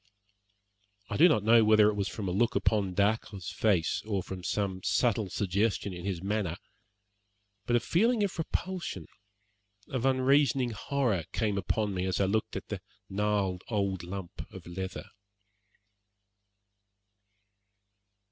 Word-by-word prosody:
I -, -, -1 dB
do 175 Hz, +4 st, +7 dB
not 110 Hz, -10 st, +2 dB
know 115 Hz, +1 st, +6 dB
whether 110 Hz, -1 st, +6 dB
it 105 Hz, -, +2 dB
was 100 Hz, -1 st, -1 dB
from 100 Hz, -1 st, -5 dB
a -, -, -1 dB
look 115 Hz, +6 st, +1 dB
upon 100 Hz, -4 st, +1 dB
Dacre's 100 Hz, -2 st, 0 dB
face, 95 Hz, -7 st, +1 dB
or 100 Hz, -4 st, -2 dB
from 95 Hz, -1 st, -7 dB
some 95 Hz, -1 st, -1 dB
subtle 110 Hz, -1 st, +1 dB
suggestion 100 Hz, +1 st, 0 dB
in 90 Hz, 0 st, -7 dB
his 95 Hz, -3 st, -3 dB
manner, 100 Hz, -4 st, -1 dB, 1.1 s
but 120 Hz, -, +2 dB
a -, -, +5 dB
feeling 215 Hz, -, +2 dB
of 200 Hz, -, -1 dB
repulsion, 180 Hz, +2 st, -3 dB, 0.8 s
of 130 Hz, -3 st, -2 dB
unreasoning 135 Hz, -1 st, +3 dB
horror, 110 Hz, -, -1 dB
came 105 Hz, -3 st, 0 dB
upon 100 Hz, +1 st, -1 dB
me 95 Hz, 0 st, -1 dB
as 95 Hz, -, -1 dB
I 100 Hz, -, +3 dB
looked 110 Hz, +3 st, -1 dB
at -, -, -6 dB
the -, -, -4 dB, 0.3 s
gnarled 100 Hz, -2 st, 0 dB
old 100 Hz, -4 st, -1 dB
lump 90 Hz, 0 st, -7 dB
of -, -, -10 dB
leather. 95 Hz, +2 st, -5 dB
105 Hz, 140 wpm, -30 LUFS, 95-120 Hz, 1.1 s, do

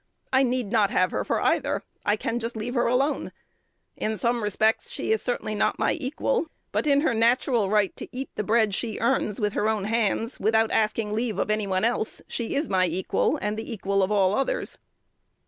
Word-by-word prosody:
I 260 Hz, -, +5 dB
need 250 Hz, -5 st, 0 dB
not 215 Hz, -4 st, +3 dB
have 185 Hz, 0 st, +2 dB
her -, -, -1 dB
for -, -, 0 dB
either. -, -, +1 dB, 0.2 s
I 205 Hz, -, +2 dB
can 230 Hz, +2 st, -2 dB
just 235 Hz, +1 st, -4 dB
leave 230 Hz, +3 st, -3 dB
her 240 Hz, -2 st, +2 dB
alone. 265 Hz, +5 st, 0 dB, 0.6 s
In 220 Hz, 0 st, -2 dB
some 235 Hz, +4 st, 0 dB
respects, 215 Hz, -, +1 dB
she 465 Hz, -3 st, 0 dB
certainly 245 Hz, -, -2 dB
is 210 Hz, -, -4 dB
not -, -, +1 dB
my -, -, +2 dB
equal; 330 Hz, -, -1 dB, 0.2 s
but -, -, 0 dB
in 285 Hz, -1 st, +4 dB
her 300 Hz, -5 st, +2 dB
natural 230 Hz, -1 st, +2 dB
right 210 Hz, -1 st, +2 dB
to -, -, -6 dB
eat 260 Hz, +1 st, -6 dB
the 210 Hz, -, -3 dB
bread 220 Hz, -1 st, +2 dB
she 220 Hz, +1 st, -3 dB
earns 230 Hz, -3 st, +1 dB
with 210 Hz, -2 st, 0 dB
her 215 Hz, -, +1 dB
own 215 Hz, -3 st, 0 dB
hands, 225 Hz, +2 st, 0 dB
without 220 Hz, +1 st, +2 dB
asking 215 Hz, -1 st, 0 dB
leave 220 Hz, -2 st, -1 dB
of 210 Hz, -, 0 dB
any 215 Hz, -1 st, 0 dB
one 190 Hz, +2 st, +1 dB
else, 230 Hz, -2 st, -1 dB
she 235 Hz, +2 st, -3 dB
is 290 Hz, +2 st, 0 dB
my 185 Hz, -2 st, +2 dB
equal, 180 Hz, +3 st, 0 dB
and 210 Hz, +1 st, -1 dB
the 225 Hz, -, -6 dB
equal 200 Hz, -2 st, 0 dB
of 190 Hz, +2 st, +1 dB
all 195 Hz, -2 st, +3 dB
others." 270 Hz, -, -1 dB
220 Hz, 210 wpm, -25 LUFS, 210-245 Hz, 0.6 s, I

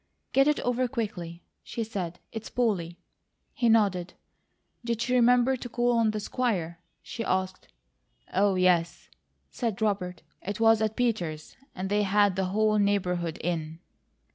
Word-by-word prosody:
"Get 270 Hz, +1 st, +5 dB
it 300 Hz, -, +2 dB
over 250 Hz, +1 st, 0 dB
quickly," 195 Hz, -9 st, -5 dB, 0.2 s
she 235 Hz, -, -4 dB
said. 185 Hz, -6 st, -5 dB
"It's 225 Hz, -1 st, -6 dB
Polly?" 185 Hz, -9 st, -1 dB, 0.6 s
He 235 Hz, -, +1 dB
nodded. 195 Hz, -5 st, +2 dB, 0.7 s
"Did 235 Hz, -1 st, -2 dB
she 245 Hz, +2 st, -1 dB
remember 250 Hz, +1 st, +4 dB
to 245 Hz, -1 st, -7 dB
call 240 Hz, +1 st, +1 dB
on 225 Hz, -1 st, +3 dB
the 215 Hz, 0 st, -2 dB
Squire?" 195 Hz, -8 st, -2 dB, 0.2 s
she 230 Hz, -, -5 dB
asked. 185 Hz, -2 st, -2 dB, 0.7 s
"Oh, 195 Hz, 0 st, +3 dB
yes," 180 Hz, -2 st, +1 dB, 0.4 s
said 230 Hz, -6 st, -3 dB
Robert. 195 Hz, -5 st, -1 dB, 0.2 s
"It 200 Hz, +3 st, -5 dB
was 225 Hz, -1 st, +5 dB
at 220 Hz, 0 st, 0 dB
Peters', 175 Hz, -11 st, -2 dB, 0.2 s
and 185 Hz, +1 st, -3 dB
they 205 Hz, +1 st, +1 dB
had 205 Hz, -1 st, +3 dB
the 190 Hz, 0 st, 0 dB
whole 215 Hz, +3 st, +2 dB
neighbourhood 180 Hz, -5 st, 0 dB
in." 160 Hz, -2 st, -3 dB
205 Hz, 145 wpm, -27 LUFS, 180-230 Hz, 0.7 s, Get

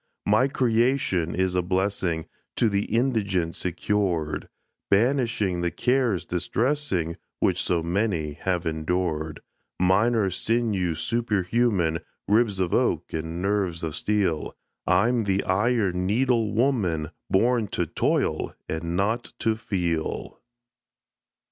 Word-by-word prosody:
My 110 Hz, +6 st, +4 dB
creation 120 Hz, -9 st, +1 dB
is 95 Hz, 0 st, +1 dB
a 90 Hz, -, +2 dB
blessing 95 Hz, -2 st, -1 dB, 0.3 s
To 115 Hz, -, +3 dB
the 100 Hz, 0 st, 0 dB
indigent 105 Hz, -8 st, 0 dB
secured, 90 Hz, -3 st, -1 dB, 0.4 s
Banishing 115 Hz, -5 st, +2 dB
the 85 Hz, -, +1 dB
cares 125 Hz, -3 st, +1 dB
distressing 90 Hz, -, -1 dB, 0.2 s
Which -, -, +2 dB
so 85 Hz, -2 st, 0 dB
many 85 Hz, -4 st, 0 dB
have 90 Hz, +3 st, -2 dB
endured: 80 Hz, -1 st, -2 dB, 0.4 s
Mine 95 Hz, +6 st, +3 dB
are 100 Hz, -4 st, +1 dB
sinews 95 Hz, -6 st, 0 dB
superhuman, 105 Hz, -6 st, +1 dB, 0.3 s
Ribs 105 Hz, -2 st, +2 dB
of 90 Hz, -2 st, 0 dB
oak -, -, +1 dB
and 80 Hz, +2 st, -3 dB
nerves 95 Hz, -4 st, 0 dB
of 80 Hz, -2 st, -3 dB
steel 95 Hz, -7 st, 0 dB, 0.3 s
I'm 115 Hz, +6 st, +3 dB
the 100 Hz, 0 st, +1 dB
Iron 95 Hz, -2 st, +1 dB
Needle 115 Hz, 0 st, +2 dB
Woman 100 Hz, -, +1 dB, 0.2 s
Born 115 Hz, +2 st, +2 dB
to -, -, -1 dB
toil -, -, 0 dB
and 85 Hz, +2 st, -3 dB
not 110 Hz, +5 st, -1 dB
to 110 Hz, -1 st, +1 dB
feel. 90 Hz, -8 st, -3 dB
95 Hz, 115 wpm, -25 LUFS, 85-115 Hz, 0.4 s, My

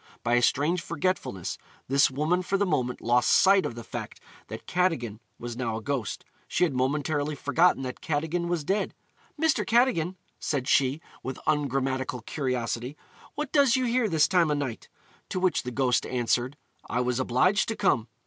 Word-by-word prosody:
By 120 Hz, -, +1 dB
a 120 Hz, -, +4 dB
strange 150 Hz, +8 st, +2 dB
forgetfulness, 175 Hz, -, -2 dB, 0.3 s
this 140 Hz, +2 st, +4 dB
woman 155 Hz, +7 st, 0 dB
for 195 Hz, +2 st, 0 dB
the 200 Hz, -, +1 dB
moment 125 Hz, -9 st, -1 dB
lost 120 Hz, 0 st, +2 dB
sight 195 Hz, 0 st, +5 dB
of 115 Hz, -, -7 dB
the 120 Hz, -, -7 dB
fact -, -, -7 dB, 0.3 s
that 110 Hz, +2 st, -8 dB
Cadogan 160 Hz, -, 0 dB, 0.2 s
was 120 Hz, 0 st, -6 dB
now 115 Hz, -3 st, -2 dB
a -, -, -6 dB
ghost; 130 Hz, -7 st, -3 dB, 0.2 s
she -, -, +1 dB
had 165 Hz, -6 st, +2 dB
momentarily 145 Hz, +3 st, 0 dB
forgotten 145 Hz, +2 st, +2 dB
that 125 Hz, -1 st, -6 dB
Cadogan 160 Hz, +3 st, -1 dB
was 170 Hz, -3 st, -1 dB
dead. 195 Hz, +6 st, -1 dB, 0.4 s
'Mr. 320 Hz, -1 st, +2 dB
Cadogan,' 225 Hz, -8 st, +2 dB, 0.2 s
said 135 Hz, -4 st, -2 dB
she, 135 Hz, +3 st, +2 dB, 0.2 s
with 130 Hz, 0 st, -5 dB
ungrammatical 135 Hz, -4 st, 0 dB
curiosity, 125 Hz, 0 st, -3 dB, 0.4 s
'what 300 Hz, -2 st, -4 dB
does 280 Hz, -4 st, +4 dB
you 260 Hz, -1 st, +1 dB
here 240 Hz, -2 st, +1 dB
this 160 Hz, -3 st, +4 dB
time 175 Hz, -4 st, +3 dB
o' 150 Hz, -, +2 dB
night?' 140 Hz, -5 st, -4 dB, 0.4 s
To 185 Hz, -, -2 dB
which 185 Hz, -1 st, +2 dB
the 125 Hz, -, -5 dB
ghost 125 Hz, 0 st, +1 dB
answered, 125 Hz, +2 st, 0 dB, 0.3 s
'I 125 Hz, -, 0 dB
was 125 Hz, 0 st, 0 dB
obliged 130 Hz, -, +2 dB
to 225 Hz, -, -2 dB
come.' 115 Hz, -, +1 dB
145 Hz, 175 wpm, -27 LUFS, 125-180 Hz, 0.4 s, sight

